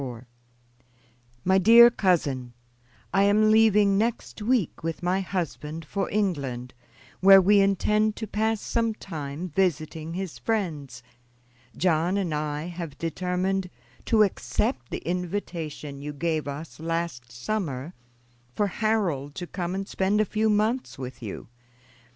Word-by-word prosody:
"MY 190 +1 +4
DEAR 235 +5 +8
COUSIN: 145 - 0 0.6
I 195 - +4
am 210 +2 +4
leaving 210 -2 +5
next 230 0 -2
week 225 - 0
with 165 +2 -4
my 180 +2 +1
husband 165 -4 -4
for 195 +5 -2
England, 140 -12 -2 0.5
where 195 0 +9
we 200 +2 +5
intend 210 +2 +2
to 220 - -5
pass 220 +1 -1
some 230 -2 -1
time 160 -2 -6
visiting 160 -2 -1
his 190 -3 -5
friends. 150 - -3 0.7
John 175 +2 +2
and 180 -6 -1
I 150 0 -2
have 170 -4 -7
determined 180 +2 -1 0.4
to 220 -2 +5
accept 130 -10 -1
the - - -6
invitation 165 -5 -4
you 150 +1 -5
gave 155 0 -1
us 145 +3 -7
last 165 -7 -3
summer 140 - -3 0.6
for 205 - +2
Harold 190 -9 -1
to 175 - -5
come 175 0 -4
and 195 0 -4
spend 195 +2 0
a 215 - +3
few 215 +2 0
months 215 +4 0
with 125 -2 -7
you. 105 -4 -7
180 Hz, 130 wpm, -26 LUFS, 150-205 Hz, 0.7 s, where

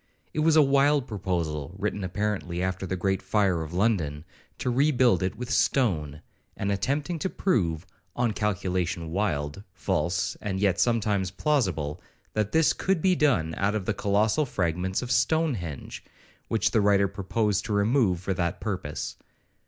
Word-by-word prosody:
It - - -2
was 160 +1 +4
a 155 - +7
wild 140 0 +3
proposal 85 -6 -3
(written 105 0 -2
apparently 95 -2 -2
after 95 +1 -2
the 95 - -2
great 95 +1 0
fire 95 -5 +1
of 80 -1 -6
London) 85 -6 0 0.3
to 125 - -1
rebuild 125 - +3
it 95 0 -1
with 125 0 -6
stone, 80 - +1 0.3
and 100 - -1
attempting 140 - -1
to 190 - -1
prove, 85 - 0 0.3
on 120 -2 +1
a - - -5
calculation 90 -5 -1
wild, 80 -4 -1
false, 90 - -1
and 95 -2 -2
yet 100 -2 +2
sometimes 105 -5 +1
plausible, 95 - -1 0.3
that 110 -1 0
this 160 -1 +4
could 190 -2 0
be 185 +3 +3
done 125 - +2
out 100 +2 +1
of 105 -4 -2
the 110 - 0
colossal 105 +8 +1
fragments 90 0 -1
of 125 - -5
Stonehenge, 125 - 0 0.4
which 110 - +1
the 110 - +3
writer 100 -1 +4
proposed 100 +1 -1
to 110 - -2
remove 100 -3 +2
for 95 +1 -1
that 85 0 -2
purpose. 95 -8 -4
100 Hz, 160 wpm, -27 LUFS, 90-120 Hz, 0.4 s, a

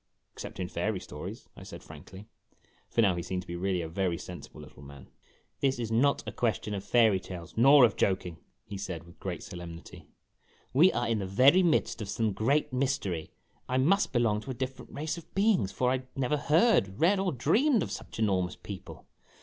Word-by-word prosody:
except - - -8
in - - -2
fairy - - -2
stories," - - -8
I - - -12
said - - -10
frankly, 95 +3 -12 0.6
for 115 - +2
now 95 -4 +3
he 85 - -3
seemed 90 +1 -4
to - - -23
be 85 - -5
really 90 0 -1
a - - -4
very 85 +1 -1
sensible 90 0 -10
little - - -14
man. 70 -1 -13 0.5
"This 135 -2 +1
is 115 -2 -4
not 135 +5 +2
a - - -3
question 110 -3 -1
of 100 -1 -4
fairy 110 -5 +4
tales, 90 -2 -9
nor 135 +3 +7
of 110 - 0
joking 90 -3 0 0.2
!" - - -49
he 100 -2 -7
said, 90 -4 -5
with 85 +1 -17
great 90 -3 -5
solemnity. 85 -1 -10 0.7
"We 165 +8 +6
are 120 - -1
in 115 -2 0
the 95 - -3
very 130 - +5
midst 150 -9 +1
of 100 - -5
some 110 0 0
great 135 +8 +1
mystery. 125 - -1 0.4
I 130 - +1
must 190 +10 +3
belong 115 -4 +1
to 135 - -11
a 130 - -3
different 130 +1 -6
race 155 +4 -4
of 165 - -19
beings 195 - +2
for 125 +5 +1
I 130 0 0
never 135 +2 0
heard, 150 - +3
read, 190 +4 +4
or 190 -2 0
dreamed 215 - +2
of - - -6
such - - -7
enormous 95 -5 0
people. 100 -3 -10
115 Hz, 205 wpm, -29 LUFS, 95-140 Hz, 0.7 s, nor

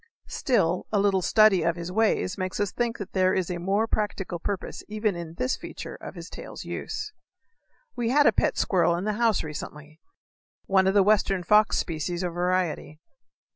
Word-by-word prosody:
Still, 180 -9 +1
a 210 - +2
little 195 -1 +2
study 215 0 +5
of 170 +1 +1
his 170 0 -6
ways 210 -2 +1
may 185 - -2
make 185 - -5
us 205 -2 0
think 240 -1 -2
that 200 -2 -8
there 185 -1 +3
is 185 -2 -1
a 175 - -3
more 195 +5 +1
practical 205 -5 -2
purpose 195 +1 -4
even 215 -2 -1
in 170 -1 -7
this 255 +8 0
feature - - -8
of - - -9
his - - -8
tail's - - -9
use. 425 - -5 0.8
We 235 -1 -1
had 290 +3 +4
a - - +7
pet - - 0
squirrel 170 -3 +2
in 175 - -3
the 215 +1 0
house 225 -3 +3
recently 150 0 -8 0.7
one 190 -1 +3
of 190 - +2
the 200 - +6
western 195 -2 +2
fox 210 +4 +4
species 170 +2 -2
or 175 - -1
variety. 175 -3 -1
190 Hz, 190 wpm, -26 LUFS, 175-215 Hz, 0.8 s, a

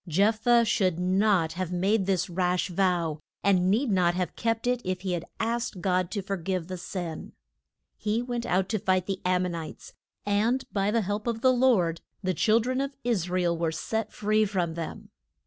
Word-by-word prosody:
Jeph 205 +7 +3
thah 240 +1 +5
should 190 -6 +1
not 185 -2 +2
have 180 0 -3
made 190 +3 +1
this 185 -2 +1
rash 180 +1 0
vow, 175 -4 0 0.2
and 185 -2 +3
need 230 +5 +2
not 175 -2 +3
have 180 -1 -2
kept 230 0 -1
it 245 0 +1
if 185 0 -2
he 190 -1 -2
had 170 -1 -2
asked 230 -3 -2
God 180 -1 +1
to 200 -1 -3
for 195 +1 -3
give 180 0 -3
the 185 - -4
sin. 175 -3 -6 0.6
He 215 +2 0
went 240 -1 -3
out 185 +1 +1
to 215 - 0
fight 185 -1 +1
the 195 -1 -3
Am 180 0 +2
mon 180 -1 -2
ites, 165 -2 -8 0.3
and 220 +6 +1
by 200 0 +1
the 230 +2 +2
help 205 +3 -3
of 230 -1 -1
the 260 0 +5
Lord 225 -10 +2 0.2
the 185 0 +1
chil 215 +7 +3
dren 255 +3 -1
of 275 0 -3
Is 210 -8 0
ra 180 0 0
el 170 -1 +2
were 165 -1 -1
set 220 +7 -3
free 215 +1 +1
from 185 -5 -1
them. 165 -1 -7
190 Hz, 205 wpm, -27 LUFS, 180-220 Hz, 0.6 s, thah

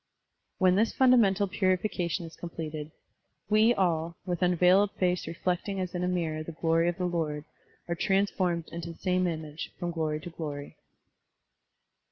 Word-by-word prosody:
When 185 0 +4
this 225 +2 +3
fundamental 220 -7 +4
piuification 185 -2 0
is 165 - -11
completed, 155 -3 -6 0.6
"we 215 +2 +6
all, 170 -6 +1
with 175 -3 -2
tmveiled 180 +3 +4
face 180 -1 0
reflect 180 +3 -2
ing 195 -1 -2
as 185 -1 -3
in 180 0 -2
a - - +1
mirror 165 -4 -1
the 160 +1 -7
glory 165 +1 +2
of 175 - -3
the 180 - -1
Lord, 155 -4 -2 0.4
are 170 - 0
transformed 190 -3 +1
into 170 0 -6
the - - -19
same 185 -1 +1
image, 155 -2 -5
from 175 -1 -3
glory 155 -2 -1
to 175 - -8
glory.' 145 -3 -6
175 Hz, 160 wpm, -29 LUFS, 165-185 Hz, 0.6 s, we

